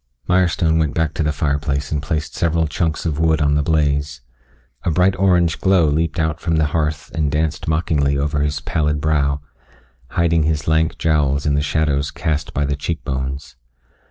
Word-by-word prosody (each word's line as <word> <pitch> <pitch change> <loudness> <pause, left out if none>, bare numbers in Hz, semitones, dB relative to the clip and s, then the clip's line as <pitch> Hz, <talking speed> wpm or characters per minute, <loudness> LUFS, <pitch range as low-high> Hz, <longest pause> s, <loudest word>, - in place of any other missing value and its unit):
Mirestone 85 -3 +2
went 80 -3 0
back 80 -2 0
to - - -2
the 75 -1 +1
fireplace 70 -1 -1
and 75 -2 -1
placed 75 +1 -3
several 85 -1 +1
chunks 80 +2 -2
of 80 -2 -1
wood 80 -1 +2
on 75 -1 +2
the 75 - +2
blaze. 75 -2 0 0.6
A - - -1
bright 90 +4 +3
orange 90 -3 +2
glow 95 -3 +4
leaped 80 +3 0
out 80 0 0
from 85 -2 -1
the 80 -1 +2
hearth 75 -2 -1
and 75 -3 0
danced 80 +1 -1
mockingly 75 -3 +1
over 75 +1 -1
his 75 +1 -1
pallid 75 -3 0
brow, 75 -2 +1 0.7
hiding 85 -1 +1
his 75 -1 -1
lank 80 0 +1
jowls 75 -3 +1
in 75 - +2
the 70 - +1
shadows 75 -1 0
cast 75 -2 -2
by 75 - -1
the 70 0 -1
cheekbones. 70 -3 -4
75 Hz, 180 wpm, -19 LUFS, 75-80 Hz, 0.7 s, glow